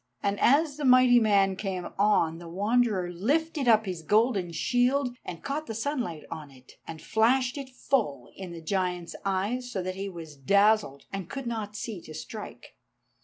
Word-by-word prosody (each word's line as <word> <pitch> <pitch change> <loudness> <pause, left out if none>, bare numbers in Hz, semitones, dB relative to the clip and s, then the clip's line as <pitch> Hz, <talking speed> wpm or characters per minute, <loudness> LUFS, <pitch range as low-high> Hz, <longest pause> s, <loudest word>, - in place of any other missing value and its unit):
And 200 0 0
as 285 +2 +3
the 300 - -5
mighty 255 -2 +6
man 200 -3 +3
came 185 -2 -4
on, 170 -6 +3
the 170 -1 -10
Wanderer 205 -1 +1
lifted 285 - 0
up 220 -2 +5
his 180 -4 -4
golden 205 0 +2
shield 245 +6 +1
and 170 - -8
caught 300 +3 -3
the 225 - -5
sunlight 225 - -3
on 150 -2 -7
it, 130 -2 -17 0.2
and 160 -1 -7
flashed 255 - +2
it 275 -2 -6
full 220 - -1
in 190 -2 -8
the 170 -1 -8
giant's 180 -1 -2
eyes, 205 +6 -1
so 190 -5 -3
that 185 +1 -3
he 195 +1 -5
was 165 -4 -9
dazzled, 200 0 +2
and 195 -3 -5
could 270 -1 -5
not 220 -3 -4
see 210 -4 -5
to 155 - -11
strike. 210 - -9
205 Hz, 175 wpm, -28 LUFS, 180-245 Hz, 0.2 s, mighty